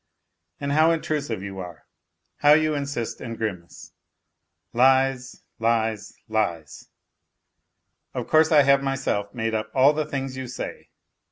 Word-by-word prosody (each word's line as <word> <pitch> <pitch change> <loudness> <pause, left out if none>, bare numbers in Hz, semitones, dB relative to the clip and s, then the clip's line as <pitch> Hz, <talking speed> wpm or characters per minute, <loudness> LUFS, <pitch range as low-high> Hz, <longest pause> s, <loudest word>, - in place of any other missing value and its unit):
And 140 0 -3
how 155 +3 +4
intrusive 145 - -2
you 95 -1 -7
are, 90 -4 -9 0.5
how 145 0 +6
you 155 0 +3
insist 140 -5 -4
and 115 -2 -6
grimace! 95 -6 -6 0.8
Lies, 130 0 +2 0.2
lies, 110 -2 -1
lies! 100 -9 -3 0.6
" - - -53
Of - - -3
course 155 +1 +4
I 150 -2 +6
have 140 0 +4
myself 135 -7 -2
made 115 -1 -2
up 110 -1 -2
all 135 +3 +5
the 150 0 -2
things 135 -3 -4
you 130 -1 -5
say. 125 - -7
130 Hz, 140 wpm, -24 LUFS, 110-140 Hz, 0.8 s, how